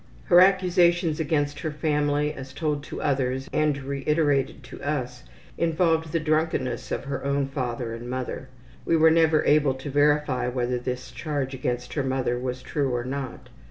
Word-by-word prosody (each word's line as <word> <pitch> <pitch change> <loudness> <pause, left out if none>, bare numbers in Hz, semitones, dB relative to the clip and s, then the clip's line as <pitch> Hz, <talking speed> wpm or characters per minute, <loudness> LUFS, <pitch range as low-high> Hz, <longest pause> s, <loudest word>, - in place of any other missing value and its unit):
Her 175 - +6
accusations 175 -3 +3
against 145 -2 0
her 160 - -2
family 150 0 0
as 135 -2 -9
told 145 0 -1
to - - -6
others, 130 -1 0
and 155 -2 +2
reiterated 140 0 0
to 130 - -11
us, 125 -4 -3 0.3
involved 165 -1 +1
the 165 - +1
drunkenness 155 -5 -1
of - - -2
her 140 0 -4
own 140 0 +1
father 125 -4 -3
and 120 +1 -7
mother. 130 +1 -4 0.3
(We 165 - +2
were 160 0 +6
never 160 -1 +4
able 145 -3 +4
to 135 +2 -7
verify 145 -3 +2
whether 125 0 -1
this 125 0 -5
charge 145 -4 -3
against 125 -1 -3
her 145 - -1
mother 130 -2 -1
was 125 0 -4
true 140 -2 -1
or 120 - -1
not.) 135 0 -5
140 Hz, 165 wpm, -25 LUFS, 130-155 Hz, 0.3 s, Her